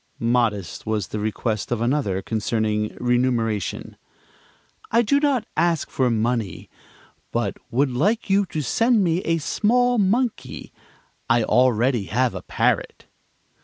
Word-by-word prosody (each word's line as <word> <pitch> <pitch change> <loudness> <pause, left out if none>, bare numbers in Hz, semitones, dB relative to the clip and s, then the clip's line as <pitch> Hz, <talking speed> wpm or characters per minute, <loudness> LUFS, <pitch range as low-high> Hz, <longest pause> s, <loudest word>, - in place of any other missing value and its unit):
Modest 115 -7 -1
was 105 -6 -1
the 105 - -4
request 110 +1 -2
of 120 - 0
another, 115 -6 0
concerning 110 -1 -1
remuneration: 120 -4 -1 0.9
"I 235 +2 +3
do 280 +6 +2
not 280 -6 +1
ask 165 0 0
for 130 -2 +1
money, 115 -2 -2 0.6
but - - -2
would 135 +3 +1
like 200 - 0
you 195 0 +2
to 155 -3 -3
send 230 - +2
me 170 -1 +1
a 165 -2 0
small 245 +9 +1
monkey. 205 - -1 0.6
I 115 0 +3
already 125 -2 +2
have 125 +5 0
a - - -6
parrot." - - -1
125 Hz, 130 wpm, -23 LUFS, -, 0.9 s, I